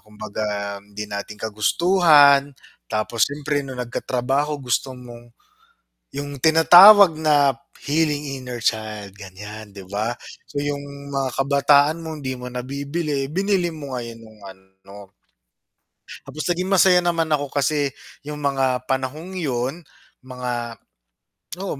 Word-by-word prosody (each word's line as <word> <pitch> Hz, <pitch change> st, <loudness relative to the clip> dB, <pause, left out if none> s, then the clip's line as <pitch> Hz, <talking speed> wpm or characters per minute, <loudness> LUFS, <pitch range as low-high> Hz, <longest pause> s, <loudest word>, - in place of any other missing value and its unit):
kumbaga 105 Hz, -1 st, -5 dB
hindi 105 Hz, +1 st, -8 dB
natin 100 Hz, 0 st, -7 dB
kagustuhan. 145 Hz, -, +4 dB, 0.4 s
Tapos 110 Hz, +1 st, +1 dB
siyempre 145 Hz, 0 st, -3 dB
no'ng 130 Hz, -2 st, -7 dB
nagkatrabaho 135 Hz, +4 st, -2 dB
gusto 130 Hz, +1 st, -1 dB
mong 120 Hz, -2 st, -13 dB, 0.8 s
'yong 145 Hz, 0 st, -6 dB
tinatawag 175 Hz, +4 st, +8 dB
na 145 Hz, -5 st, +3 dB, 0.2 s
healing 145 Hz, -2 st, -1 dB
inner 125 Hz, -2 st, -7 dB
child, 110 Hz, -3 st, -2 dB
ganiyan, 105 Hz, +2 st, -10 dB
'di 100 Hz, -, -9 dB
ba? 110 Hz, +4 st, -2 dB, 0.3 s
So, 145 Hz, -1 st, -4 dB
'yong 140 Hz, -1 st, -6 dB
mga 135 Hz, -1 st, -1 dB
kabataan 140 Hz, +2 st, +3 dB
mong 160 Hz, -2 st, -7 dB
'di 130 Hz, -1 st, -4 dB
mo 125 Hz, -, -8 dB
nabibili, 140 Hz, +3 st, -3 dB
binili 180 Hz, +1 st, -1 dB
mo 140 Hz, -4 st, -6 dB
ngayon 115 Hz, -1 st, -8 dB
no'ng 110 Hz, -1 st, -17 dB
ano. 95 Hz, +1 st, -16 dB, 1.3 s
Tapos 155 Hz, -, -6 dB
naging 180 Hz, +1 st, -2 dB
masaya 190 Hz, -2 st, +5 dB
naman 170 Hz, -2 st, -1 dB
ako 145 Hz, -1 st, 0 dB
kasi 145 Hz, +1 st, 0 dB, 0.4 s
'yong 150 Hz, -, -5 dB
mga 135 Hz, -2 st, 0 dB
panahong 135 Hz, +8 st, -3 dB
'yon, 135 Hz, 0 st, -2 dB, 0.4 s
mga 125 Hz, -2 st, -5 dB, 0.9 s
oo, 185 Hz, -7 st, -4 dB
135 Hz, 120 wpm, -21 LUFS, 115-150 Hz, 1.3 s, tinatawag